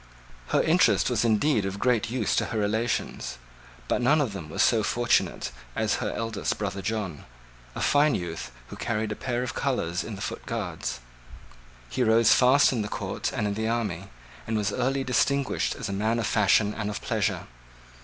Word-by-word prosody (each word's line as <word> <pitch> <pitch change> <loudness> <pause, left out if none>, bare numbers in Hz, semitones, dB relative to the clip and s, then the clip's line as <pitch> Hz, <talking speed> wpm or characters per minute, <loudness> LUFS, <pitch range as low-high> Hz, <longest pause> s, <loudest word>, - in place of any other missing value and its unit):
Her - - +2
interest - - +3
was - - +1
indeed 115 +1 +2
of 95 0 -3
great 120 0 +1
use 120 -4 0
to - - +2
her 115 - -4
relations: 110 - -1 0.5
but - - 0
none 145 +6 +4
of 130 -8 0
them 85 -6 -7
was 100 +6 +1
so 115 -2 +4
fortunate 120 +3 +1 0.2
as - - +1
her - - -2
eldest 115 -2 -2
brother 100 - -3
John, 100 -6 -3 0.5
a - - -4
fine 145 0 +4
youth, 85 -6 -4 0.2
who - - -8
carried 110 -2 -2
a - - -2
pair 120 +1 -2
of 125 - -4
colours 90 -10 -1
in 110 - -6
the 95 - -9
foot 100 - -5
guards. - - -4 0.9
He 125 - -3
rose 115 -1 +5
fast 130 +2 +5
in 115 - 0
the 105 - -3
court - - -3
and 105 - -2
in 100 - 0
the 110 +2 -2
army, 105 -6 -2 0.4
and 110 0 0
was 105 -2 0
early 135 +2 0
distinguished 135 +1 +1
as - - -5
a 100 - -3
man 110 +4 0
of 115 - -1
fashion 105 0 +3
and 105 -1 -3
of 105 - -4
pleasure. 105 -5 -1
110 Hz, 190 wpm, -26 LUFS, 100-120 Hz, 0.9 s, rose